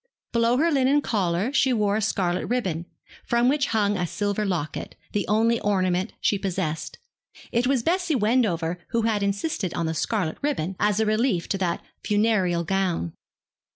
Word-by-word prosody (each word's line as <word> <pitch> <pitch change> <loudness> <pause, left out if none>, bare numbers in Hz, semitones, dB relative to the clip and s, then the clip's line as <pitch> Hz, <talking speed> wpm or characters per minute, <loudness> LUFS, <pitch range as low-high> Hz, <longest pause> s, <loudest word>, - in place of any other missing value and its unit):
Below 235 +1 +3
her 330 +4 +3
linen 275 0 +3
collar 200 +1 0
she 265 - +3
wore 210 -4 +2
a 220 - 0
scarlet 185 -4 0
ribbon, 185 -9 -1 0.4
from 235 +1 +2
which 280 +1 +2
hung 205 -2 +1
a 180 -1 -1
silver 205 +3 -1
locket, 170 -7 -3 0.2
the 205 - -1
only 225 +2 +3
ornament 185 -1 0
she 205 - +1
possessed. 170 -5 -3 0.5
It 240 +2 +1
was 265 -3 +1
Bessie 355 0 +1
Wendover 205 -8 +1
who 230 -1 0
had 220 -2 +1
insisted 200 - -1
on 170 - -1
the 160 - -1
scarlet 170 -1 -1
ribbon, 195 - -1
as 210 0 +2
a 220 - +3
relief 215 -4 +1
to 195 - 0
that 175 -3 -1 0.2
funereal 205 -5 +2
gown. 175 - -1
205 Hz, 165 wpm, -25 LUFS, 180-235 Hz, 0.5 s, Below